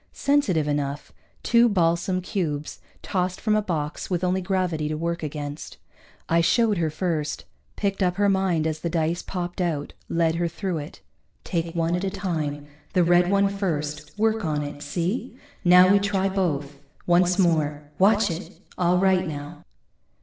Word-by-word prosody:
Sensitive 200 - +1
enough, 145 0 -2 0.3
two 235 0 +5
balsam 180 -1 +1
cubes, 160 -6 -3 0.2
tossed 185 -1 -1
from 215 -1 +1
a 215 - +3
box 160 -6 -3
with 180 -1 -1
only 185 +1 +1
gravity 180 -5 -1
to 155 - -2
work 170 +1 -2
against. 145 -1 -6 0.5
I 170 +1 +3
showed 210 +3 +3
her 160 -2 +1
first, 155 -2 -2 0.3
picked 200 -1 -2
up 180 -1 +2
her 205 +1 +2
mind 190 -5 +1
as 155 -1 -1
the 170 - -2
dice 165 +1 0
popped 180 0 -4
out, 155 -5 -2 0.2
led 165 -1 +1
her 170 0 +1
through 175 0 -3
it. 150 +4 -9 0.4
_Take 170 -1 -2
one 165 0 +1
at 180 - -2
a 195 - 0
time, 160 -7 -3 0.3
the 180 - +4
red 175 +1 +4
one 200 0 +3
first. 160 -6 -3
Work 220 0 +1
on 150 -3 -1
it, 145 0 -7
see? 180 - -3 0.3
Now 180 +1 +7
we 200 - +5
try 195 -1 0
both. 145 -7 -2 0.3
Once 175 +1 +3
more 155 -5 +1 0.2
watch 205 +1 +4
it! 165 +4 -7 0.2
All 180 0 +3
right, 185 -1 +3
now. 150 +1 -7
175 Hz, 165 wpm, -24 LUFS, 155-190 Hz, 0.5 s, Now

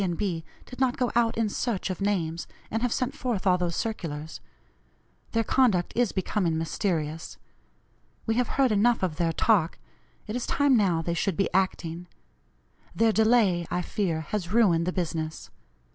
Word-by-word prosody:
and 175 -3 -1
B. 175 -6 -2 0.2
did 255 - -11
not 260 -2 +2
go 250 -2 0
out 235 -1 +2
in 225 -1 +2
search 205 -2 -2
of 185 - -6
names, 175 -5 -1 0.2
and 225 - -1
have 245 -1 0
sent 255 +3 -1
forth 240 -7 -2
all 180 -1 +4
those 175 -1 -1
circulars. 160 -8 -4 0.9
Their 225 - +2
conduct 220 -9 +2
is 240 -3 +2
becoming 185 -3 0
mysterious. 160 -2 -2 0.9
We 225 - +1
have 245 +1 +1
heard 265 -3 +4
enough 215 +1 +3
of 165 -4 -1
their 170 -2 +1
talk 175 -1 +2 0.5
it 215 - -5
is 245 - -3
time 285 -2 +3
now 180 -7 +2
they 170 - -1
should 175 +1 -1
be 195 - 0
acting. 180 -2 -1 0.9
Their 225 -1 +4
delay, 215 -6 +3
I 180 0 -1
fear, 175 -7 -1
has 180 +2 -4
ruined 180 -7 +3
the - - +1
business. 160 -3 -3
190 Hz, 170 wpm, -27 LUFS, 170-225 Hz, 0.9 s, all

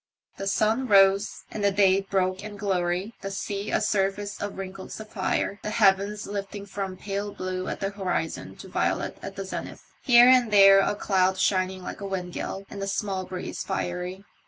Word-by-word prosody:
The 195 - -4
sun 220 +6 +1
rose, 195 -1 +4
and 210 - -4
the 200 - +5
day 195 -1 +4
broke 185 -1 -1
in 210 -1 -8
glory, 190 +1 -1
the 195 - -4
sea 200 +1 -4
a - - +2
surface 205 -1 -1
of 205 -1 -4
wrinkled 190 0 -7
sapphire, 205 -1 -2
the - - -4
heavens 205 -1 +2
lifting 200 0 -5
from 195 -1 -5
pale 200 +1 -4
blue 185 -1 -4
at - - -4
the 195 0 -1
horizon 185 -5 -3
to - - -11
violet - - -1
at 195 - -7
the 195 -1 -5
zenith, 190 - -6 0.2
here 240 -2 +7
and 255 -2 +6
there 195 -1 +8
a 195 - +1
cloud 190 -2 +1
shining 185 -1 0
like - - -7
a 200 - -4
wind 180 -2 -4
gall, 195 +1 -5
and 200 - -8
the 195 - -2
small 195 -1 -2
breeze 185 -1 -6
fiery. 180 +2 -4
195 Hz, 185 wpm, -26 LUFS, 190-205 Hz, 0.2 s, there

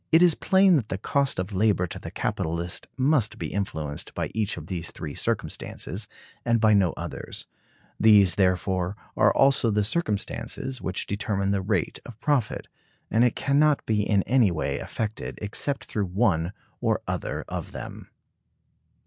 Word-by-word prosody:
It 160 +2 +7
is 175 -2 +6
plain 190 0 +4
that 115 -6 -3
the 95 - -2
cost 140 +7 0
of 95 +3 -3
labor 95 -2 +2
to 85 - -7
the - - -7
capitalist 85 +2 -2
must 130 -6 +2
be - - -5
influenced 80 -7 -4
by - - -2
each 110 -3 -1
of 80 - -7
these 85 -2 -4
three 75 -3 -6
circumstances, - - -3 0.4
and 115 -1 +2
by 110 -1 +5
no 95 -4 +3
others. - - -5 0.5
These, 105 -5 +6
therefore, 90 0 +1 0.2
are - - +5
also 135 -4 +4
the 105 -1 +2
circumstances 130 - -1
which 95 - -2
determine 100 -1 -1
the 100 -1 +1
rate 95 -3 -1
of 115 -2 -11
profit; 135 -7 0 0.4
and 115 +3 +4
it 125 - +3
can 140 +1 +1
not 150 -1 +3
be 110 -2 +1
in 100 -2 +2
any 125 -5 +4
way 85 - -2
affected 110 -1 -4
except 125 +6 -3
through 105 -3 -2
one 90 -3 +1 0.3
or - - +1
other - - -3
of - - -5
them. - - -8
105 Hz, 165 wpm, -26 LUFS, 95-125 Hz, 0.5 s, It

